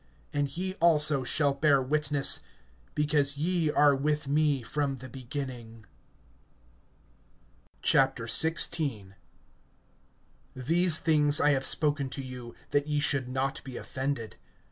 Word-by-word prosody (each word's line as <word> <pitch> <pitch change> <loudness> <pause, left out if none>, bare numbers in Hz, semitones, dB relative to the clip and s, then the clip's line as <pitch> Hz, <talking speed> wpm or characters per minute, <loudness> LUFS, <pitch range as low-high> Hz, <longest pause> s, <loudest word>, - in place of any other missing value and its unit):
(27)And 145 +1 -3
ye 185 +1 -3
also 150 -4 +4
shall 140 +2 +1
bear 140 0 +2
witness, 145 +1 +1 0.6
because 145 -1 0
ye 165 +1 -1
are 145 -1 +3
with 150 +1 -2
me 145 -2 0
from 140 +1 -3
the 130 +1 -11
beginning. 125 -4 -8 2.0
XVI. 135 - +2 1.4
THESE 165 +6 +3
things 150 -3 +2
I 150 - +3
have 135 -1 0
spoken 145 -3 +1
to 135 - -7
you, 125 -2 -10 0.2
that 145 +1 0
ye 150 -1 -1
should 140 -4 -1
not 135 +1 -3
be 130 -2 -8
offended. 130 -4 -5
140 Hz, 115 wpm, -28 LUFS, 130-150 Hz, 2.0 s, also